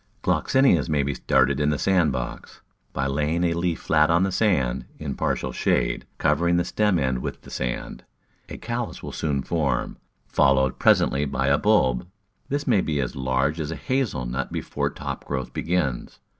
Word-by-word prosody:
Gloxinias 130 - +3
may 75 -2 +2
be 70 +1 -1
started 65 +2 +2
in 75 0 +2
the 75 - 0
sand 90 -1 +2
box 65 -2 -6 0.3
by 70 - -2
laying 75 +5 0
a 85 -1 +2
leaf 85 0 -1
flat 75 0 +3
on 85 +2 +4
the 95 - 0
sand, 85 - +1
in 75 -3 -4
partial - - -2
shade, - - 0
covering 85 +4 +2
the 85 - +1
stem 105 -1 +1
end 65 -4 0
with - - -6
the - - -13
sand. - - -4 0.5
A - - -7
callus 120 0 -4
will - - -6
soon 70 -4 -1
form, 70 -7 -1 0.3
followed 65 -1 +2
presently 70 +2 +3
by 70 -1 -1
a 70 - +3
bulb. 85 - +2 0.4
This 145 +1 -1
may 110 -7 +3
be 75 -4 -1
as 65 -3 -2
large 65 +4 0
as 75 -2 -3
a 80 - -3
hazel 130 - -1
nut 65 +2 -3
before - - -2
top - - -6
growth 65 -2 -4
begins. 85 -8 -2
75 Hz, 180 wpm, -24 LUFS, 65-85 Hz, 0.5 s, on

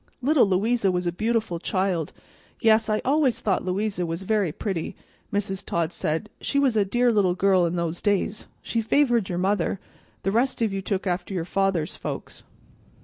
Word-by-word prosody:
"Little 285 -4 +4
Louisa 200 +2 +2
was 180 0 -1
a 175 - +1
beautiful 220 -2 -1
child; 185 -4 -1 0.5
yes, 220 0 +4
I 215 0 0
always 270 -3 +2
thought 195 -4 0
Louisa 190 +1 -1
was 165 +2 -3
very 205 -4 +1
pretty," 175 0 -4 0.4
Mrs. 195 -1 -2
Todd 170 0 -1
said. 160 +7 -2
"She 280 - -1
was 270 -4 +3
a 210 - +4
dear 240 +5 +2
little 195 -5 +2
girl 190 -2 +3
in 170 - -2
those 170 0 -2
days. 205 0 0 0.2
She 230 - -1
favored 240 -3 +2
your 175 - -2
mother; 190 0 0 0.4
the 195 - +1
rest 245 +5 +1
of 215 -3 0
you 195 - -2
took 195 +1 -2
after 180 +1 -2
your 170 -2 -2
father's 190 -4 0
folks." - - -6
195 Hz, 180 wpm, -25 LUFS, 180-220 Hz, 0.5 s, Little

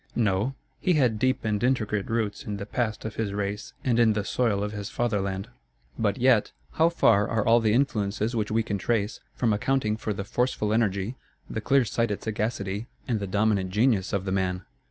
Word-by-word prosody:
No, 110 +3 +1 0.2
he 180 - +2
had 125 -8 +2
deep 130 -1 +1
and 105 0 0
intricate 105 -6 +1
roots 110 -3 -1
in 105 -1 -4
the 100 - -5
past 110 0 -2
of 110 - -5
his 105 -3 -1
race 100 0 -3
and 120 -3 +2
in 115 -2 +5
the 105 -1 -2
soil 110 -5 +1
of 105 - -2
his 105 -1 -5
fatherland. 100 -4 -1 0.5
But 105 -1 0
yet, 125 -4 +3 0.2
how 165 +1 +3
far 110 -11 +3
are 110 -2 0
all 115 +1 +6
the 110 -2 +2
influences 110 -3 0
which 110 -2 -1
we 110 +1 +1
can 100 -2 -2
trace, 110 0 -1 0.2
from 115 -4 +2
accounting 110 0 0
for 110 -1 -3
the 100 -1 -3
forceful 105 -1 0
energy, 110 +1 0 0.3
the 110 - -4
clear 135 +2 +3
sighted 105 -1 -1
sagacity, 105 -1 -2 0.2
and 115 -4 0
the 100 - -3
dominant 100 -1 +1
genius 105 -1 +2
of 100 -1 -1
the 95 - -2
man! 90 -1 -1
110 Hz, 195 wpm, -26 LUFS, 100-120 Hz, 0.5 s, all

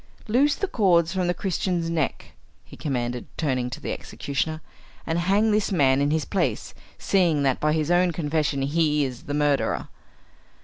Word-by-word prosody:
"Loose 275 +6 +3
the 395 - -2
cords 175 - +2
from 185 -2 0
the 175 - +2
Christian's 180 -3 -1
neck," 165 -4 -2 0.3
he - - -14
commanded, 125 -4 -3
turning 130 -5 -1
to 125 - -7
the - - -4
executioner, 150 +3 -3 0.5
"and 165 +1 -1
hang 200 +5 +2
this 210 -1 +1
man 140 -6 +3
in 145 - +2
his 155 -1 0
place, 195 - -1 0.2
seeing 170 -7 +2
that 135 -2 +1
by 150 - +1
his 155 +1 0
own 175 0 +3
confession 150 -3 -1
he 150 0 +1
is 125 -2 -7
the 145 - -3
murderer." 145 -1 0
160 Hz, 170 wpm, -24 LUFS, 140-180 Hz, 0.5 s, Loose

